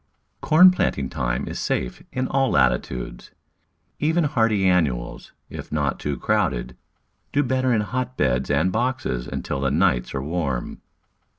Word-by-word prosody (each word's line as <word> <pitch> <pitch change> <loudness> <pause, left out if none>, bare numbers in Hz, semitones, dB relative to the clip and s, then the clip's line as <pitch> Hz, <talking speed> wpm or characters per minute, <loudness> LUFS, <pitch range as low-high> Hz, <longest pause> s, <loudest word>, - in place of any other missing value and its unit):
Corn 180 +4 +7
planting 70 - -1
time - - -2
is - - -5
safe 60 -1 -2
in 130 0 -2
all 135 -1 +1
latitudes. 60 -1 0 0.7
Even 160 +3 +2
hardy 115 -9 +2
annuals, 75 -10 0 0.2
if - - -9
not 75 -3 -1
too 70 -2 -3
crowded, 60 +1 -1 0.6
do 145 - +2
better 130 0 +1
in 110 -3 +2
hotbeds 105 - -1
and 80 +6 +2
boxes 115 - -2
until 70 - -4
the 70 - +1
nights 60 0 +1
are 65 - -2
warm. 75 -5 -3
90 Hz, 135 wpm, -23 LUFS, -, 0.7 s, Corn